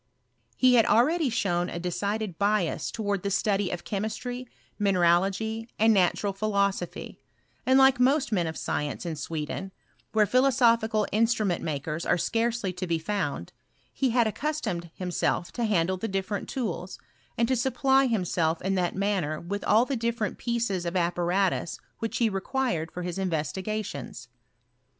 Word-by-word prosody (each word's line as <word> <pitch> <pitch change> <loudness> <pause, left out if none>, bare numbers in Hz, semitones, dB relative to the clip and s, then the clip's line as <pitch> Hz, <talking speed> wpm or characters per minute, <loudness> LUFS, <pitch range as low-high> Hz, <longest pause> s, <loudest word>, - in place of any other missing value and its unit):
He 255 -1 +5
^ad 225 - +6
already 300 +6 +3
shown 185 -6 0
a - - -5
decided 200 +2 -2
bias 200 -4 +1
towards 205 -3 -2
the 200 - -2
study 195 0 +1
Df 175 -1 -4
chemistry, 225 +5 -4 0.3
mineralogy, 195 +4 +2
and 220 +1 +5
natural 195 +1 +2
philosophy; 200 -3 -1 0.5
and, 260 +1 +5
like 265 -2 +6
most 270 +2 +3
men 180 -5 +1
of 160 - -5
science 150 +4 -3
in 165 -2 -3
Sweden, 160 +5 -4 0.4
where 215 -1 +4
phiiosophical 230 -3 +3
instrument 215 -4 +1
makers 155 +1 -3
are - - +2
scarcely 230 -1 0
to 180 +1 -4
be 165 -1 +1
Bound, 160 - -3 0.4
he 265 - +1
had 240 0 +3
accustomed 220 - -2
himself 180 -1 -1
to 240 - -2
handle 185 -3 +1
the 225 +5 -3
^different 195 +1 -2
tools, 195 -8 -4 0.4
and 230 - +2
to 260 - +2
supply 265 +2 +3
himself 175 -7 0
in 190 +1 0
that 180 -2 0
manner 190 -6 0
with 200 +4 -4
all 220 +4 +5
the 275 - -2
different 230 -3 -2
pieces 235 -6 -1
of 170 +1 -3
apparatus 175 0 0 0.2
which 225 - -2
he 235 - +2
Acquired 195 -4 -1
for 180 - -5
his 180 +2 -4
investigations. 185 - -3
200 Hz, 150 wpm, -27 LUFS, 175-230 Hz, 0.5 s, ^ad